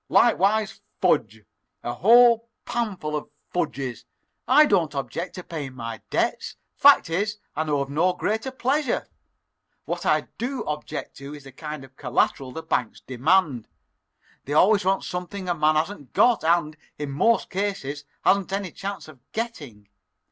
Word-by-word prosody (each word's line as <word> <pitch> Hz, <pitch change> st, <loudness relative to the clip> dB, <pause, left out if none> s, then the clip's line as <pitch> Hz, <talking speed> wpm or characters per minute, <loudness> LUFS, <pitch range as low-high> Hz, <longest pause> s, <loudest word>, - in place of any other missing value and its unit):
"Likewise 215 Hz, -2 st, +3 dB, 0.2 s
fudge 110 Hz, -, +1 dB, 0.4 s
a 120 Hz, -, -2 dB
whole 235 Hz, -, +5 dB, 0.2 s
panful 200 Hz, -10 st, -2 dB
of 150 Hz, -, -4 dB, 0.2 s
fudges! 135 Hz, -7 st, -3 dB, 0.4 s
I 305 Hz, -, +7 dB
don't 170 Hz, -, +1 dB
object 150 Hz, +5 st, -4 dB
to 180 Hz, -, -7 dB
paying 145 Hz, -7 st, -6 dB
my 115 Hz, -2 st, -6 dB
debts; -, -, -1 dB, 0.2 s
fact -, -, +6 dB
is, 205 Hz, +5 st, -1 dB, 0.2 s
I 155 Hz, -, -1 dB
know 145 Hz, -2 st, 0 dB
of 135 Hz, -, -3 dB
no 175 Hz, +5 st, +2 dB
greater 220 Hz, +7 st, -2 dB
pleasure. 260 Hz, +1 st, 0 dB, 0.8 s
What -, -, -3 dB
I -, -, +3 dB, 0.2 s
do 255 Hz, +3 st, -2 dB
object 150 Hz, 0 st, -5 dB
to 140 Hz, +2 st, -8 dB
is 145 Hz, -, -12 dB
the 135 Hz, -, -12 dB
kind 150 Hz, +1 st, -7 dB
of 135 Hz, 0 st, -16 dB
collateral 130 Hz, -2 st, 0 dB
the 160 Hz, +4 st, -7 dB
banks 120 Hz, -3 st, -2 dB
demand. 130 Hz, -, +1 dB, 0.8 s
They 145 Hz, -, -3 dB
always 200 Hz, +6 st, +5 dB
want 190 Hz, +1 st, +1 dB
something 180 Hz, +2 st, -5 dB
a 175 Hz, -, +2 dB
man 155 Hz, -1 st, +2 dB
hasn't 155 Hz, -, -2 dB
got 245 Hz, -7 st, +4 dB
and, 160 Hz, -2 st, +2 dB, 0.2 s
in 145 Hz, -2 st, -4 dB
most 230 Hz, +12 st, +2 dB
cases, 185 Hz, -8 st, -3 dB, 0.2 s
hasn't 195 Hz, -1 st, +3 dB
any 195 Hz, -2 st, -2 dB
chance 200 Hz, +1 st, -6 dB
of 155 Hz, -4 st, -14 dB
getting. 145 Hz, -, -5 dB
170 Hz, 155 wpm, -24 LUFS, 140-205 Hz, 0.8 s, I